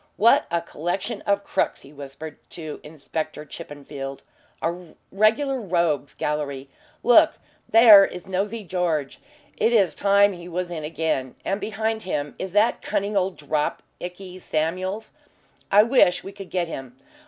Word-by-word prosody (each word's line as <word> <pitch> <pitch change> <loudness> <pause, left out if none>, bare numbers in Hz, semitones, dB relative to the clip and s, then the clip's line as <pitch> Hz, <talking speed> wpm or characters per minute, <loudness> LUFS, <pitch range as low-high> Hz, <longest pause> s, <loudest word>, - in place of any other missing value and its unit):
"What 230 +3 +5
a 170 0 0
collection 180 +7 -3
of 200 0 +2
crooks," - - -1
he 140 - -15
whispered 145 +2 -9
to 155 -3 -7
Inspector 155 0 -5
Chippenfield. 140 -2 -8 0.4
"A 170 0 -4 0.2
regular 240 +6 +2
rogues' 170 - 0
gallery. 140 -2 -3 0.3
Look - - +6 0.4
there 220 -3 +9
is 180 -2 -4
'Nosey 200 +4 -2
George'; 170 -6 -2 0.4
it 230 - +2
is 205 -6 +3
time 200 0 +4
he 175 0 -10
was 175 +1 -3
in 160 -3 -4
again. 150 -5 -2
And 195 +2 -1
behind 220 +1 -2
him 150 -7 -3
is 190 - -4
that 210 +3 +3
cunning 200 +1 -2
old 190 -1 0
'drop' 150 0 -2 0.2
Ikey 180 +1 -8
Samuels 185 +6 -2 0.6
I 205 +1 +7
wish 225 -7 +4
we 195 - -7
could 195 -2 -10
get 180 -2 -1
him. 130 -5 -8
180 Hz, 145 wpm, -24 LUFS, 150-200 Hz, 0.6 s, there